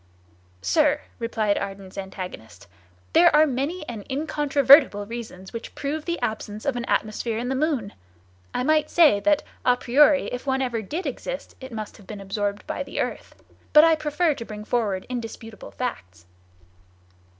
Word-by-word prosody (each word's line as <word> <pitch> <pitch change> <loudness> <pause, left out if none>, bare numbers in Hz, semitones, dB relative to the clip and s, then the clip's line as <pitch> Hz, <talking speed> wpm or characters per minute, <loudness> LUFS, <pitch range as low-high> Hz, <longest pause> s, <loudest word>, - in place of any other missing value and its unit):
"Sir," 300 -2 +3 0.2
replied 220 -3 0
Ardan's 195 -1 -7
antagonist, 180 - -8 0.5
"there 340 +1 +7
are 305 +1 +7
many 300 +5 -2
and 225 -4 -6
incontrovertible 280 -6 +4
reasons 215 -4 -8
which 230 - -7
prove 300 +2 -3
the 345 0 -2
absence 215 -1 -4
of 280 -3 0
an 240 -1 -3
atmosphere 220 +1 -1
in 245 +2 -3
the 265 - 0
moon. 265 -8 -1 0.6
I - - -1
might 305 +1 +2
say 305 -12 +5
that, 300 +7 +2 0.2
a 250 0 +4
priori, 280 +4 +4
if 250 +3 -6
one 265 0 +1
ever 235 -3 -2
did 310 - -5
exist, - - -5
it 260 0 -8
must 215 -2 -6
have 200 -4 -17
been 210 0 -7
absorbed 200 +1 -3
by - - -4
the - - -5
earth; - - -4 0.4
but 300 - +9
I 330 0 +6
prefer 310 +1 +1
to 235 - -7
bring 210 -1 -8
forward 210 -6 -1
indisputable 225 -2 -7
facts." 90 - -6
245 Hz, 160 wpm, -24 LUFS, 210-295 Hz, 0.6 s, but